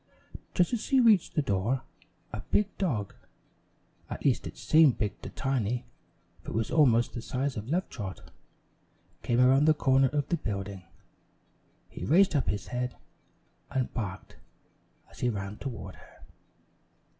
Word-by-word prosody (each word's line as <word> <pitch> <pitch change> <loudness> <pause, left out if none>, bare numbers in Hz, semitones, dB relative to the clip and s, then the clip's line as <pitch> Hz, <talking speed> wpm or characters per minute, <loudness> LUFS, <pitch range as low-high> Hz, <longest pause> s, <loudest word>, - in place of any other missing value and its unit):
Just 180 +6 +2
as 235 - 0
she 270 -2 +2
reached 220 -7 +4
the 150 - +2
door, 115 +5 0 0.5
a 110 - -3
big 205 -1 +1
dog 120 - -1 1.0
(at - - -6
least - - +2
it - - -10
seemed 155 -5 +5
big 105 -2 -3
to - - -7
Tiny, 125 -2 -1 0.6
for - - -9
it - - -5
was 115 0 -1
almost 120 -7 +4
the 120 - -5
size 130 +3 -2
of 110 +3 -6
Love 180 +5 0
Trot) 95 -5 -8 0.9
came 120 0 +1
around 130 +3 +5
the 155 0 +5
corner 135 -2 +4
of 145 +1 -1
the 170 - +1
building. 100 - -5 1.0
He - - -9
raised 180 +3 +4
up 140 - +1
his 100 0 -3
head 125 0 -3 0.7
and 130 -3 -2
barked 100 -5 -5 0.7
as - - -15
he 125 - +1
ran 100 -1 -4
toward 130 -5 -6
her. - - -18
130 Hz, 155 wpm, -29 LUFS, 110-150 Hz, 1.0 s, seemed